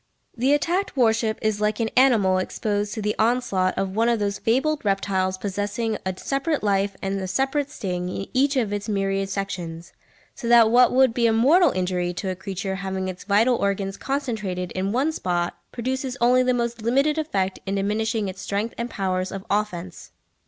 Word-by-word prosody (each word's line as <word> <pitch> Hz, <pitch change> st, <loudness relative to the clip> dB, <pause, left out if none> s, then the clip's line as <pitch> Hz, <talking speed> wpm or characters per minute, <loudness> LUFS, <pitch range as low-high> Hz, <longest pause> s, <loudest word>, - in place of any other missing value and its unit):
The 260 Hz, +4 st, +2 dB
attacked 345 Hz, +3 st, -1 dB
warship 225 Hz, -2 st, +2 dB
is 215 Hz, -1 st, 0 dB
like 210 Hz, +1 st, 0 dB
an 225 Hz, -1 st, -1 dB
animal 220 Hz, -8 st, +4 dB
exposed 205 Hz, +1 st, -2 dB
to 215 Hz, -, -4 dB
the 210 Hz, 0 st, 0 dB
onslaught 220 Hz, -5 st, +1 dB
of 195 Hz, 0 st, -2 dB
one 230 Hz, +2 st, +3 dB
of 235 Hz, -, +2 dB
those 205 Hz, -1 st, -2 dB
fabled 285 Hz, +6 st, +1 dB
reptiles 195 Hz, -2 st, 0 dB
possessing 205 Hz, +3 st, -2 dB
a 190 Hz, -1 st, -3 dB
separate 275 Hz, -, -1 dB
life 200 Hz, -1 st, +1 dB
and 195 Hz, 0 st, -2 dB
a 190 Hz, -, -3 dB
separate 270 Hz, +7 st, 0 dB
sting 180 Hz, -7 st, -4 dB
in 195 Hz, -, -4 dB
each 275 Hz, +2 st, +2 dB
of 220 Hz, -5 st, 0 dB
its 205 Hz, +1 st, -4 dB
myriad 195 Hz, -1 st, 0 dB
sections; 175 Hz, -4 st, -5 dB, 0.4 s
so 235 Hz, -, -6 dB
that 230 Hz, -2 st, +6 dB
what 250 Hz, +1 st, +6 dB
would 260 Hz, -2 st, +4 dB
be 235 Hz, -1 st, +2 dB
a -, -, +3 dB
mortal 290 Hz, +11 st, +5 dB
injury 180 Hz, -1 st, -1 dB
to 190 Hz, +2 st, -3 dB
a -, -, -4 dB
creature 190 Hz, 0 st, -4 dB
having 190 Hz, -1 st, -3 dB
its 180 Hz, -1 st, -8 dB
vital 220 Hz, +5 st, +3 dB
organs 195 Hz, -1 st, -1 dB
concentrated 215 Hz, -11 st, -3 dB
in 190 Hz, +1 st, -2 dB
one 270 Hz, +7 st, +1 dB
spot 175 Hz, -, -2 dB, 0.2 s
produces 260 Hz, +2 st, -3 dB
only 250 Hz, +2 st, +4 dB
the 255 Hz, 0 st, +2 dB
most 235 Hz, -1 st, -2 dB
limited 275 Hz, +7 st, +2 dB
effect 195 Hz, -11 st, -1 dB
in 195 Hz, -, -1 dB
diminishing 210 Hz, +2 st, 0 dB
its 190 Hz, 0 st, -7 dB
strength 205 Hz, +3 st, -2 dB
and 235 Hz, +1 st, -2 dB
powers 185 Hz, -3 st, -2 dB
of 195 Hz, 0 st, -6 dB
offence. 185 Hz, -4 st, -3 dB
210 Hz, 190 wpm, -24 LUFS, 190-245 Hz, 0.4 s, that